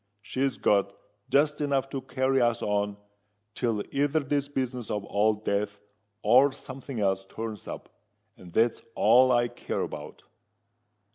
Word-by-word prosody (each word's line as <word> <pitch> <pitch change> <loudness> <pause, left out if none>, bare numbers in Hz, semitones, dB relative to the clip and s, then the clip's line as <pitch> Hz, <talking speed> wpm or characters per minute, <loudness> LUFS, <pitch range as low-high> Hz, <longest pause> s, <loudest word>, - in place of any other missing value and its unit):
She's 135 +2 -1
got 100 -1 +2 0.3
just 150 +1 +2
enough 140 -2 +1
to 135 - -3
carry 130 0 +1
us 120 -1 +1
on 105 0 0 0.6
till 115 -4 -1
either 145 +3 +1
this 140 0 -1
business 130 -4 -3
of 105 -1 -2
Old 105 +1 +1
Death 100 0 -1 0.4
or 130 +6 +6
some 130 0 -9
thing 130 -3 -6
else 95 -1 +1
turns 110 +1 -7
up: - - -7 0.5
and 90 - -14
that's 115 +5 +2
all 125 +4 +6
I 120 -1 +3
care - - -4
about." - - -6
120 Hz, 145 wpm, -28 LUFS, 105-135 Hz, 0.6 s, or